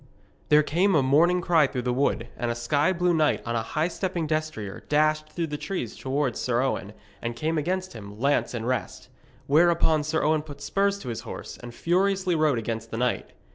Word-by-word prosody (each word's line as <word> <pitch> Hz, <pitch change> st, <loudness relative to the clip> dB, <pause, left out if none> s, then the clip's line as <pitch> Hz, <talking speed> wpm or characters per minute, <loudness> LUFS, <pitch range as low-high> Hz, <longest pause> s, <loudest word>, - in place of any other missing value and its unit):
There 150 Hz, 0 st, +6 dB
came 180 Hz, +6 st, +2 dB
a 145 Hz, -, +4 dB
mourning 170 Hz, +7 st, +4 dB
cry 165 Hz, -4 st, +4 dB
through 125 Hz, -2 st, -4 dB
the 125 Hz, 0 st, 0 dB
wood, 125 Hz, -3 st, 0 dB
and 120 Hz, -, -2 dB
a 120 Hz, -, -1 dB
sky 145 Hz, +8 st, +1 dB
blue 180 Hz, -1 st, +1 dB
knight 155 Hz, -2 st, +2 dB
on 115 Hz, 0 st, -2 dB
a 115 Hz, -, +1 dB
high 155 Hz, +8 st, -1 dB
stepping 180 Hz, -2 st, -2 dB
destrier 155 Hz, -10 st, -3 dB
dashed 155 Hz, +1 st, +2 dB
through 170 Hz, -, -2 dB
the 150 Hz, -2 st, -5 dB
trees 150 Hz, -, -4 dB
towards 135 Hz, -2 st, -1 dB
Sir 120 Hz, -1 st, 0 dB
Owen, 105 Hz, -6 st, -2 dB, 0.3 s
and 120 Hz, 0 st, -3 dB
came 155 Hz, +5 st, -1 dB
against 185 Hz, +4 st, -2 dB
him, 105 Hz, -2 st, -10 dB
lance 140 Hz, -1 st, +1 dB
in 115 Hz, -1 st, -4 dB
rest. 125 Hz, -2 st, -3 dB, 0.4 s
Whereupon 160 Hz, 0 st, +3 dB
Sir 155 Hz, +1 st, -1 dB
Owen 155 Hz, 0 st, +2 dB
put 145 Hz, -2 st, -11 dB
spurs 200 Hz, 0 st, 0 dB
to -, -, -6 dB
his 115 Hz, -1 st, -4 dB
horse, 115 Hz, -, -8 dB
and 120 Hz, -1 st, -9 dB
furiously 185 Hz, +6 st, +1 dB
rode 155 Hz, -5 st, +2 dB
against 115 Hz, 0 st, -4 dB
the 115 Hz, -, -5 dB
knight. 125 Hz, +1 st, -1 dB
150 Hz, 205 wpm, -26 LUFS, 120-170 Hz, 0.4 s, There